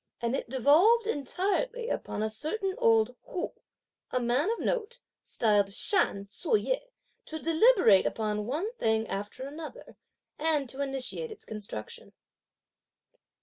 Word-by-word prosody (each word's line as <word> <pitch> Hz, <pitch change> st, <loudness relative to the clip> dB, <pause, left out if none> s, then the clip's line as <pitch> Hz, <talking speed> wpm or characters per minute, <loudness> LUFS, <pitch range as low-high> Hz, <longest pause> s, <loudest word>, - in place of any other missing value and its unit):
And 235 Hz, +2 st, -1 dB
it 260 Hz, -, -4 dB
devolved 320 Hz, -, +4 dB
entirely 415 Hz, -, -1 dB
upon 215 Hz, -, -3 dB
a 220 Hz, -, 0 dB
certain 380 Hz, -, -2 dB
old 225 Hz, +2 st, +3 dB
Hu, 355 Hz, -, -4 dB, 0.6 s
a 255 Hz, -, 0 dB
man 250 Hz, -, +1 dB
of 460 Hz, -, 0 dB
note, 480 Hz, -1 st, -2 dB, 0.2 s
styled 205 Hz, -3 st, +2 dB
Shan 200 Hz, -, +3 dB
Tzu 335 Hz, -, 0 dB
yeh, -, -, -1 dB, 0.5 s
to 315 Hz, -, -6 dB
deliberate 325 Hz, -, +4 dB
upon 210 Hz, -1 st, -2 dB
one 340 Hz, -, -2 dB
thing 220 Hz, 0 st, +1 dB
after 205 Hz, +6 st, -5 dB
another, 310 Hz, -, -9 dB, 0.4 s
and 300 Hz, -3 st, +1 dB
to 270 Hz, +3 st, -4 dB
initiate 270 Hz, -, -2 dB
its 430 Hz, -, -11 dB
construction. 205 Hz, -, -8 dB
280 Hz, 130 wpm, -29 LUFS, -, 0.6 s, devolved